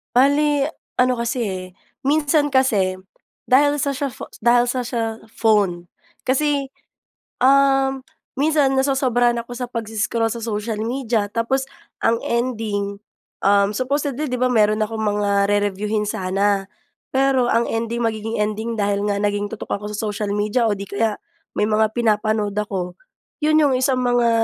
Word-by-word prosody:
Bale, 285 +2 +3 0.2
ano 250 0 +4
kasi 235 +2 -2
eh, 185 -2 -4 0.4
minsan 290 +1 +2
kasi, 210 -9 +2 0.5
dahil 290 +3 +4
sa 280 0 0
siya 280 0 -2
pho - - -9 0.2
dahil 240 +1 +4
sa 250 +1 -1
siya 230 -2 -3
phone. 200 -7 +1 0.4
Kasi, 280 +1 +1 0.8
um, 270 0 +4 0.4
minsan 290 -2 +3
nasosobrahan 260 -3 +2
ako 245 - -14
sa 245 0 -4
pags-scroll 225 -1 -1
sa 235 - -4
social 215 -1 -3
media, 230 -2 -1
tapos 250 +5 -1 0.3
ang 230 0 +2
ending, 215 -4 -2 0.4
um, 200 +1 +3
supposedly 280 +2 -1
'di 250 - -1
ba, 255 - +3
meron 215 -3 +3
akong 220 +1 -2
mga 200 -1 +1
re-reviewhin 205 +1 0
sana, 195 +1 0 0.4
pero 265 -2 +2
ang 230 +1 +2
ending, 230 +1 -2
magiging 225 -1 -2
ending 215 +2 -2
dahil 200 0 0
nga 200 - -1
naging 205 0 -1
tutok 225 - -4
ako 210 +1 -6
sa 210 +1 -3
social 205 0 -3
media 210 +4 +1
o 220 - +2
'di 200 -1 -4
kaya, 210 +1 -1 0.3
may 210 - 0
mga 215 0 +2
pinapanood 215 -3 0
ako, 190 -4 -3 0.5
'yun 310 +1 +4
'yung 285 -3 +3
isang 255 0 +1
mga, 245 -1 +2
230 Hz, 145 wpm, -21 LUFS, 210-260 Hz, 0.8 s, ano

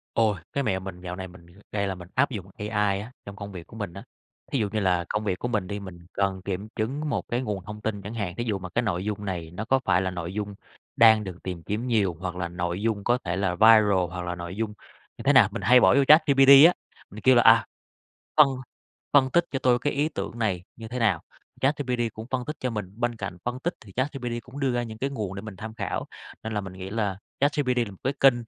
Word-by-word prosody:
Ôi! 110 -3 +3 0.2
Cái 140 - 0
mẹo 95 -6 0
mình 95 -2 -8
dạo 90 -1 -5
này 95 0 -6
mình 90 -1 -15 0.3
đây 100 -1 -1
là 95 - -2
mình 90 -1 -11
áp 130 +2 +3
dụng 100 -7 -5
AI 105 -2 0
á 110 +4 -8
trong 100 - -8
công 100 0 -7
việc 90 -3 -9
của - - -14
mình 105 -6 -5
á. 100 - -9 0.5
Thí 135 - +1
dụ 105 -2 0
như 110 - 0
là 90 -3 +1
công 105 +1 -1
việc 95 -4 -1
của - - -2
mình 110 -6 -1
đi, 100 +1 -4
mình 95 -3 -9 0.2
cần 95 -1 -1
kiểm 100 +2 -4
chứng 140 +8 -2
một - - -2
cái 120 +1 -1
nguồn 105 -6 -3
thông 105 +1 -8
tin 105 -2 -3
chẳng 100 +3 -7
hạn, 100 -6 -3
thí 120 - -2
dụ 105 -4 -1
mà 90 -1 -7
cái 115 - 0
nội 95 -5 -2
dung 105 -1 -3
này 85 -4 -4
nó 100 +5 -5
có 130 +3 +3
phải 95 -1 +3
là 95 - -1
nội 90 0 -5
dung 105 -1 -4 0.4
đang 110 -2 +6
được 95 -3 -7
tìm 90 -3 -5
kiếm 110 +7 -3
nhiều 105 -7 +1
hoặc 90 -1 -4
là 90 -1 -2
nội 85 +2 -3
dung 110 -2 -1
có 120 +3 +2
thể 85 -1 -2
là 95 -2 0
viral 105 -3 +6
hoặc 90 +1 -5
là 90 0 -3
nội 85 +1 -7
dung 110 0 -2 0.4
như - - -8
thế 145 - +4
nào, 130 -7 +7
mình 115 - -5
hay 125 +1 +6
bỏ - - +5
vô 140 - +5
ChatGPT 140 -3 +6 0.2
á, 175 - +3 0.4
mình 110 - -10
kêu 130 0 +6
là, 120 - +6
à, 115 0 +7 0.7
phân 150 -2 +9 0.7
phân 135 -2 +5
tích 175 +5 +3
cho 135 - -1
tôi 125 -2 +3
cái 145 +3 -1
ý 145 +2 +1
tưởng 100 -4 -5
này 100 -6 0
như 115 -1 -8
thế 125 +2 -4
nào, 105 -9 +2 0.4
ChatGPT 135 -3 0
cũng 110 +1 -8
phân 130 -1 -1
tích 150 +2 -5
cho 130 - -1
mình. 105 -4 -5
Bên 120 -1 0
cạnh 100 -4 -5
phân 120 +1 -2
tích 175 +5 -2
thì 100 - -14
ChatGPT 130 0 -2
cũng 135 +3 -10
đưa 135 -2 +1
ra 120 0 0
những 110 -2 -7
cái 135 +4 -1
nguồn 105 -8 -4
để 100 - -6
mình 105 -3 -8
tham 110 +3 -7
khảo, 105 -3 -3 0.4
nên 110 - -4
là 105 - 0
mình 95 -2 -8
nghĩ 95 +1 -8
là 105 -3 -1 0.2
ChatGPT 140 -3 +1
là 115 -4 0
một 95 - -12
cái 135 - +1
kênh 135 -2 +7
105 Hz, 270 wpm, -26 LUFS, 95-120 Hz, 0.7 s, phân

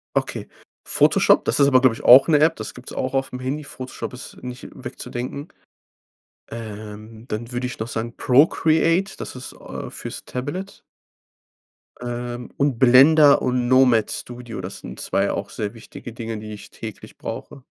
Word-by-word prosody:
Okay. - - -2 0.4
Photoshop, - - +4
das - - +1
ist 140 - +6
aber, 130 -2 +6
glaube 130 -3 +4
ich, - - -11
auch 130 +2 +9
'ne 155 -3 +4
App. 160 +2 +4
Das - - -6
gibt's 125 - -11
auch 130 0 -3
auf'm 135 -1 -2
Handy. 140 +4 -3
Photoshop 130 -3 -7
ist 125 - -10
nicht 125 0 -7
wegzudenken. 130 +5 -6 1.0
Ähm, 110 0 -9
dann 115 +2 -5
würde 125 +1 -2
ich 125 - -8
noch 110 - -3
sagen 115 0 -4
Procreate, 160 +6 +3
das - - -7
ist, 125 0 -8
äh, - - -8
fürs - - -8
Tablet. 145 +10 -5 1.2
Ähm, 120 0 -5
und 140 -4 +1
Blender 140 +4 +7
und 125 -1 0
Nomad 125 -4 +4
Studio. 120 -4 -6
Das 95 +2 -7
sind - - -9
2 - - 0
auch - - -4
sehr 105 0 -4
wichtige 115 +1 -10
Dinge, 115 -1 -5
die 105 0 -8
ich 105 - -11
täglich - - -10
brauche. 135 - -7
125 Hz, 160 wpm, -22 LUFS, 115-135 Hz, 1.2 s, auch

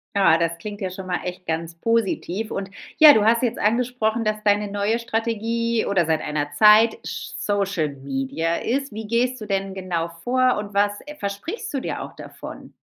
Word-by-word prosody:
Ja, 190 -5 +5
das 170 0 -1
klingt 205 +3 -7
ja 190 - -2
schon 185 +1 -8
mal 180 - -1
echt 180 0 -6
ganz 165 +1 -3
positiv. 220 0 -1
Und 195 0 -4 0.3
ja, 310 -1 +10
du 210 -1 +3
hast 230 +2 +3
jetzt 240 -1 0
angesprochen, 230 0 +1
dass 215 -1 -1
deine 205 0 +2
neue 205 +3 0
Strategie 230 0 -1
oder 190 -4 +2
seit 160 0 +1
einer 145 -1 -2
Zeit 215 +7 +6
sch - - -6
Social 200 -6 0
Media 140 +4 -2
ist. 270 +5 -2
Wie 215 0 -6
gehst 245 +2 0
du - - -5
denn 195 -1 -2
genau 180 -3 -2 0.2
vor 255 0 +3
und 205 -1 -5
was 205 +1 +2 0.3
versprichst 205 - -5
du 275 - -1
dir - - -4
auch - - -8
davon? - - -10
205 Hz, 185 wpm, -23 LUFS, 180-230 Hz, 0.3 s, ja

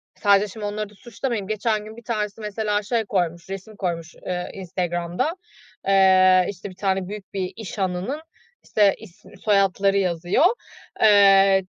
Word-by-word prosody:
Sadece, 200 0 +3
şimdi, 210 +1 -7
onları 210 0 -3
da - - -19
suçlamayayım. 235 -2 -4
Geçen 215 0 -1
gün 220 +1 -11
bir 235 - -12
tanesi 215 -2 -3
mesela 210 0 -1
şey 225 +1 -1
koymuş, 175 -3 -2
resim 195 +3 -7
koymuş, 170 -4 -4
eee, 180 -1 -3
Instagram'da. 175 - -2 0.5
Eee, 185 -1 +5
işte, 200 +1 -7
bir 185 - -13
tane 190 -1 -1
büyük 205 0 -9
bir 185 -2 -2
iş 220 -1 -8
hanının, 190 +10 -2 0.4
işte, 205 -2 +3
isim, 205 -6 -16
soyadları 195 -1 +2
yazıyor, 180 - +1 0.6
eee, 195 -2 +6
195 Hz, 150 wpm, -23 LUFS, 185-210 Hz, 0.6 s, eee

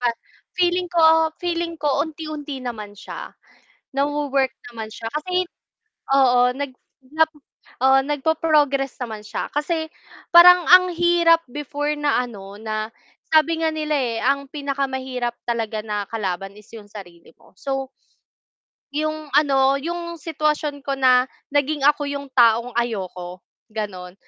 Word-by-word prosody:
Pa 245 - +2 0.5
feeling 360 0 +1
ko, 320 -2 +4
feeling 340 -1 -2
ko 285 -2 +1
unti-unti 305 -3 -7
naman 220 -5 -6
siya, - - -8 0.6
nawo-work 280 -2 0 0.2
naman 220 -2 -6
siya 225 - -6
kasi 360 +4 -1 0.7
oo, 260 -3 +5
nag 280 0 -4 0.4
nap 320 0 +4 0.5
oo, 265 0 +6
nagpo-progress 295 -2 +1
naman 220 -3 -7
siya 210 - -4
kasi 315 +2 -1 0.4
parang 355 +1 +9
ang 365 0 +7
hirap 340 -1 +4
before 295 +2 -3
na, 290 -3 +2
ano, 200 -5 -9
na 215 0 -4 0.4
sabi 320 +1 +3
nga 320 - +3
nila, 310 -1 -2
eh, 245 -5 -1
ang 280 +2 0
pinakamahirap 265 -4 -3
talaga 225 -2 -2
na 210 -1 -2
kalaban 195 -2 -4
is 210 - -18
yung 210 -2 -12
sarili 175 -5 -12
mo, - - -23
so 270 +3 -4 1.0
'Yung, 310 +1 -2
ano, 275 -2 +4
'yung 340 +1 -4
sitwasyon 305 -2 -2
ko 275 - 0
na 255 -1 +4 0.2
naging 290 +1 0
ako 290 +1 +3
yung 280 0 -4
taong 235 -1 +4
ayoko, 185 -6 -4 0.3
gano'n. 190 -4 -6
280 Hz, 130 wpm, -22 LUFS, 235-310 Hz, 1.0 s, parang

